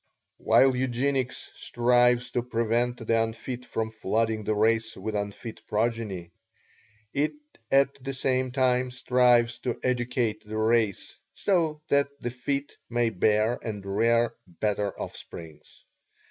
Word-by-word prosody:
While 135 Hz, -1 st, +5 dB
Eugenics 130 Hz, +1 st, -1 dB
strives 120 Hz, 0 st, +2 dB
to 120 Hz, -, 0 dB
prevent 120 Hz, 0 st, -1 dB
the 115 Hz, 0 st, +3 dB
unfit 120 Hz, +2 st, -5 dB
from 110 Hz, 0 st, -3 dB
flooding 110 Hz, 0 st, -1 dB
the 110 Hz, -, +1 dB
race 110 Hz, +1 st, +1 dB
with 105 Hz, +3 st, -4 dB
unfit 105 Hz, +2 st, -5 dB
progeny, 105 Hz, -6 st, -2 dB, 0.8 s
it 145 Hz, +2 st, +1 dB, 0.4 s
at 140 Hz, -1 st, +2 dB
the 135 Hz, -1 st, -4 dB
same 130 Hz, 0 st, 0 dB
time 125 Hz, -1 st, +2 dB
strives 125 Hz, -1 st, +3 dB
to 120 Hz, -1 st, -3 dB
educate 120 Hz, -3 st, 0 dB
the 110 Hz, +1 st, -6 dB
race 110 Hz, -2 st, +1 dB
so 160 Hz, -6 st, 0 dB
that 140 Hz, 0 st, +3 dB
the 120 Hz, -, -3 dB
fit 140 Hz, +3 st, -3 dB
may 120 Hz, -1 st, +1 dB
bear 110 Hz, +4 st, +2 dB
and 105 Hz, -3 st, -5 dB
rear 115 Hz, +4 st, +2 dB
better 100 Hz, +3 st, -1 dB
offsprings. 80 Hz, -3 st, -9 dB
120 Hz, 125 wpm, -27 LUFS, 110-125 Hz, 0.8 s, While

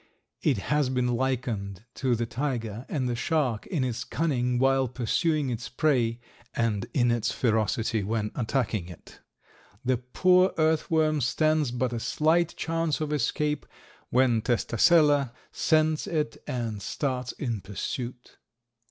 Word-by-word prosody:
It 140 Hz, -7 st, +2 dB
has 145 Hz, +6 st, 0 dB
been 125 Hz, -1 st, 0 dB
likened 120 Hz, -6 st, -2 dB
to 130 Hz, -3 st, 0 dB
the 115 Hz, +1 st, -1 dB
tiger 115 Hz, -2 st, -3 dB
and 135 Hz, -5 st, -1 dB
the 120 Hz, -, -1 dB
shark 125 Hz, -3 st, 0 dB
in 160 Hz, -9 st, -1 dB
its 125 Hz, -1 st, -2 dB
cunning 125 Hz, -6 st, 0 dB
while 135 Hz, +1 st, +3 dB
pursuing 135 Hz, +4 st, 0 dB
its 115 Hz, 0 st, -4 dB
prey 125 Hz, -5 st, +1 dB, 0.4 s
and 110 Hz, -4 st, 0 dB
in 120 Hz, -3 st, +2 dB
its 120 Hz, -2 st, 0 dB
ferocity 110 Hz, -1 st, 0 dB
when 105 Hz, +1 st, -2 dB
attacking 110 Hz, -7 st, -1 dB
it. 90 Hz, -, -13 dB, 0.7 s
The 130 Hz, 0 st, +2 dB
poor 180 Hz, +9 st, +3 dB
earth 160 Hz, -1 st, +2 dB
worm 155 Hz, -2 st, +2 dB
stands 155 Hz, +3 st, +2 dB
but 125 Hz, 0 st, -1 dB
a 115 Hz, -, -2 dB
slight 160 Hz, +7 st, +1 dB
chance 165 Hz, -2 st, -1 dB
of 150 Hz, -1 st, -2 dB
escape 150 Hz, +2 st, -1 dB, 0.4 s
when 125 Hz, -3 st, +3 dB
Testacella 140 Hz, -, +3 dB, 0.2 s
scents 155 Hz, -1 st, +2 dB
it 150 Hz, -7 st, -1 dB
and 115 Hz, -5 st, -3 dB
starts 130 Hz, +1 st, -2 dB
in 115 Hz, -7 st, -3 dB
pursuit. 120 Hz, +5 st, -6 dB
125 Hz, 135 wpm, -27 LUFS, 115-150 Hz, 0.7 s, while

